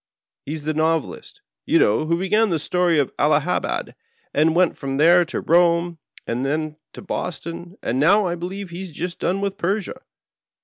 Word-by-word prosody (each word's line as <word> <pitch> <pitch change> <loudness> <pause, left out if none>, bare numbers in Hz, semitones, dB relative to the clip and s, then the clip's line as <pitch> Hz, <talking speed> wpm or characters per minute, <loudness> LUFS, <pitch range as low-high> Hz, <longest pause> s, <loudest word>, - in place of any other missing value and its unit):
He 150 - -3
is 155 -2 -6
the 155 +1 -1
Novelist, 160 0 -2 0.2
you - - +2
know, 110 +9 +2
who 170 +1 +1
began 210 +4 +2
with - - 0
the - - -1
story 180 -2 +2
of 140 -3 0
Allahabad, - - 0 0.4
and 160 +2 +3
went 180 0 +3
from 135 -1 -4
there 170 +4 +6
to 160 - -4
Eome, 170 0 +2 0.3
and 120 +2 -2
then 155 +2 -2 0.2
to - - -10
Boston, 175 0 -5
and 125 +3 -1
now 195 +8 +4
I 175 - -1
believe 180 +2 -6
he 175 +2 -6
has 190 - -6
just 175 +3 -5
done 190 +2 -1
with 200 0 -3
Persia. 205 +7 -2
170 Hz, 185 wpm, -22 LUFS, 155-185 Hz, 0.4 s, there